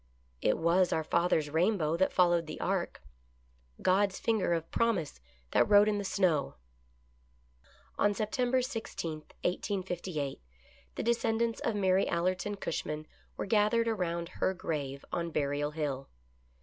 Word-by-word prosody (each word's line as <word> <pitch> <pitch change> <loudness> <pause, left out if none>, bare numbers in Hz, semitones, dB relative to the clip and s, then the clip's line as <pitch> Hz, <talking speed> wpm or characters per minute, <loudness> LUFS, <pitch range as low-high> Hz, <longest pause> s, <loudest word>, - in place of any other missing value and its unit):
It - - +2
was 175 +2 +3
our 160 - +1
father's 160 -2 +1
rainbow 165 -1 +2
that 190 +3 +2
followed 175 -2 +3
the - - -6
ark - - -2 0.4
— 60 0 -36 0.3
God's 190 +1 +3
finger 220 -6 +1
of 165 -1 -1
promise 200 - 0 0.3
that - - +3
wrote 205 0 +7
in 210 -1 +1
the - - -3
snow. 180 -7 +1 1.4
On 205 0 +3
September 245 +5 +1
i6, 220 - -4 0.2
1858, 180 - -2 0.5
the - - -3
descendants 230 0 +1
of 230 - -1
Mary 190 -1 +3
Allerton 180 +4 0
Cushman 155 -5 -4 0.3
were - - -2
gathered 215 +3 +3
around 170 -6 -1
her 190 +1 -1
grave 140 -5 -4
on 170 0 -2
Burial 145 -1 -1
Hill. 145 -3 -3
180 Hz, 135 wpm, -31 LUFS, 160-205 Hz, 1.4 s, wrote